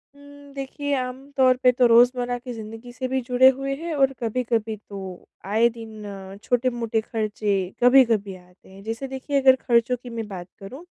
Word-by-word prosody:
उम, 285 0 -15
देखिए 280 +1 -4
आम 255 +2 -5
तौर 255 -1 +4
पे 250 - +7
तो 250 0 +2
रोज़मर्रा 245 +1 +4
की 250 -1 -8
ज़िंदगी 225 +2 -9
से 255 0 -4
भी 260 0 -1
जुड़े 250 +1 +5
हुए 275 0 -3
हैं 330 +3 -5
और 270 -1 +2
कभी-कभी 225 -1 -1
तो 190 -3 -8 0.2
आए 220 +4 +3
दिन 220 -2 -10 0.3
अ, - - -10
छोटे-मोटे 240 -3 0
खर्चे 215 -2 -2 0.3
कभी-कभी 230 -6 +4
आते 180 +1 -20
हैं। 195 +1 -14
जैसे 225 +5 -5
देखिए 270 +1 -2
अगर 260 -1 +6
खर्चों 240 0 +1
की 245 - -8
मैं 225 -2 -5
बात 180 -3 -8
करूँ 260 - -10
245 Hz, 180 wpm, -23 LUFS, 220-265 Hz, 0.3 s, पे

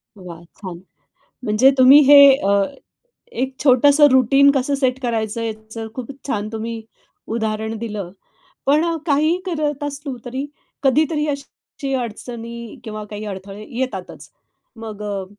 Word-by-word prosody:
वाह! 175 -3 -11 0.2
छान. 180 -3 -7 0.7
म्हणजे 220 +6 +4
तुम्ही 260 +3 +8
हे 290 - +9 0.3
अ, 200 0 +3 0.7
एक 265 - -3
छोटसं 285 +2 +5
रुटीन 275 +2 +5
कसं 275 +1 0
सेट 260 -2 0
करायचं 230 -1 -2
याचं 220 0 -6
खूप 255 0 -6 0.2
छान 210 -5 -2
तुम्ही 225 0 -5 0.5
उदाहरण 220 0 -2
दिलं. 210 -5 -5 0.6
पण 300 +4 +3 0.2
काही 310 +3 +2
करत 300 -4 -2
असलो 285 -2 -5
तरी 260 +3 -4 0.4
कधीतरी 300 +3 +2
अशी 280 0 -6
अडचणी 235 -1 -6
किंवा 215 -2 -6
काही 210 +1 -7
अडथळे 200 +1 -8
येतातच. 205 -9 -5 0.5
मग 220 -2 -8
अ, 200 -2 -3
235 Hz, 125 wpm, -20 LUFS, 215-280 Hz, 0.7 s, हे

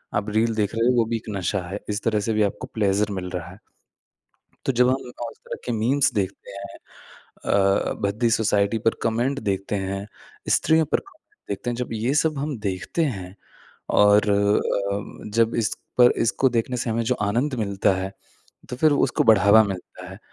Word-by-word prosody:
आप 105 +1 -1
रील 110 +2 +1
देख 105 0 -1
रहे 115 +1 +2
हो, 125 - +3
वो 115 - +4
भी 115 - 0
एक 110 - -10
नशा 95 +1 -1
है। 100 +2 -4
इस 105 +1 -2
तरह 110 -2 +1
से - - +2
भी 105 0 +2
आपको 100 - -3
प्लेज़र 105 -1 +1
मिल 90 -1 -4
रहा 90 -2 -5
है। 95 - -15 1.1
तो - - +2
जब 125 0 +3
हम 130 - +3 0.3
उस - - -16
तरह - - -6
के 125 - -2
मीम्स 125 +5 +2
देखते 100 -1 -3
हैं 100 0 -9 0.7
अ - - -5
अ, 100 0 +2
भद्दी 105 +4 +1
सोसाइटी 105 -1 +2
पर - - +3
कमेंट 120 +5 0
देखते 100 -1 -2
हैं, 100 0 -3 0.5
स्त्रियों 160 0 +3
पर 150 - 0
कमेंट 395 +1 -22
देखते 120 - -3
हैं, - - -3
जब 125 -1 -4
ये 115 +4 0
सब 155 0 +1
हम 145 -2 -3
देखते 95 - -1
हैं 90 0 -9 0.6
और 105 +1 +5
अ, 100 0 0
जब 115 0 +3
इस - - -1 0.2
पर 120 0 +8
इसको 125 +3 +2
देखने 120 +1 -1
से 120 -1 -2
हमें 115 +1 0
जो 125 +3 +1
आनंद 125 +7 0
मिलता 100 -1 +1
है, 95 +1 -4 0.6
तो 125 - -5
फिर 155 +3 +4
उसको 145 - +1
बढ़ावा 105 +1 +6
मिलता 90 -2 -7
है। 95 - -10
105 Hz, 195 wpm, -23 LUFS, 100-120 Hz, 1.1 s, पर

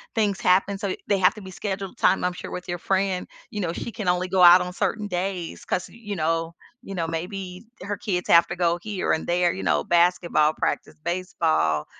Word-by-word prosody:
things 205 -3 +1
happen, 195 +2 +2
so 200 -3 -2
they 200 -2 +2
have 190 +4 +4
to 210 - -9
be 190 0 -9
scheduled 195 0 -5
time 190 - +3
I'm 180 0 0
sure - - -8
with 180 - -6
your 175 -1 -3
friend, 190 -1 0 0.2
you 210 - -3
know, 170 -2 -2
she 235 - -5
can 215 -5 -5
only 180 +1 +1
go 185 0 +1
out 175 +1 +9
on 180 0 -4
certain 205 +2 -1
days 180 -2 -4
cause, 180 - -2
you 210 -4 -7
know, 165 +1 -1 0.3
you 195 -5 -8
know, 165 -2 -1
maybe 180 +3 -5 0.2
her 205 +1 -3
kids 180 -2 -3
have 170 0 +7
to 175 - -4
go 175 -1 +1
here 210 -3 -2
and 160 - -2
there, 175 0 +2
you - - -6
know, 80 -5 +1
basketball 170 -3 +3
practice, - - -2
baseball, 80 - 0
180 Hz, 215 wpm, -24 LUFS, 170-195 Hz, 0.3 s, out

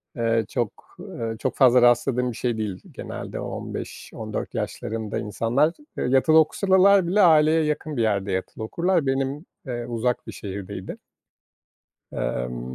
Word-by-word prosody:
eee, 115 -2 +1
çok, 120 -5 -4
eee, 115 -1 -5
çok 125 +1 -2
fazla 125 -2 +6
rastladığım 120 +1 +3
bir - - -9
şey 120 -2 -1
değil 105 -4 -4
genelde. - - -7
15-14 - - -6
yaşlarında 110 -1 -3
insanlar, 120 +9 +1 0.2
eee, - - -1
yatılı 135 +5 +4
okusalalar 190 +3 +4
bile 200 +4 +3
aileye 160 -2 +5
yakın 150 -1 -2
bir - - +1
yerde 100 -3 0
yatılı 95 +3 -3
okurlar. 170 +7 0
Benim, 135 +3 -1 0.2
eee, 120 -2 -4
uzak 120 +1 -2
bir - - -5
şehirdeydi. 100 -2 -7 1.1
Emm - - -3
125 Hz, 135 wpm, -24 LUFS, 110-155 Hz, 1.1 s, fazla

